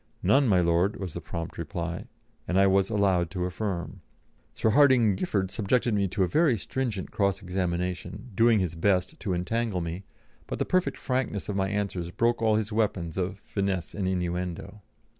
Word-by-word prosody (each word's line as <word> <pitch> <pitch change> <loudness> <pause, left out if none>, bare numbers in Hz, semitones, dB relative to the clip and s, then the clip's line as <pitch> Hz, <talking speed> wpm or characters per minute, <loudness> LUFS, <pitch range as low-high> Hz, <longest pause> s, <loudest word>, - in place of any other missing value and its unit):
"None, 140 -1 +4
my 95 -5 +4
Lord," 85 +5 +2
was 95 -5 -5
the 85 - -5
prompt 85 +1 -6
reply, 85 -1 -4 0.4
and 90 +1 +2
I 100 - +6
was 95 0 +3
allowed 95 -5 +2
to 90 +1 -2
affirm. 90 -3 -4 0.5
Sir 110 - +1
Hardinge 125 -6 +5
Giffard 95 - -1
subjected 115 +3 +1
me 100 -1 +2
to 95 +1 0
a - - +2
very 150 - +3
stringent 115 -3 -3
cross 100 -1 0
examination, 90 +4 -3
doing 115 +3 +4
his 90 -4 0
best 95 - 0
to 95 - -2
entangle 105 +2 -1
me, 85 +3 -4 0.4
but - - -4
the - - 0
perfect 185 0 +1
frankness 125 -7 -2
of 100 - -2
my 95 0 0
answers 100 -4 -2
broke 115 +5 +1
all 110 -1 +3
his 110 0 -1
weapons 100 -7 0
of 95 +1 -2
finesse 95 -4 -2
and 95 -2 -2
inuendo. 90 +2 -3
95 Hz, 180 wpm, -27 LUFS, 90-110 Hz, 0.5 s, I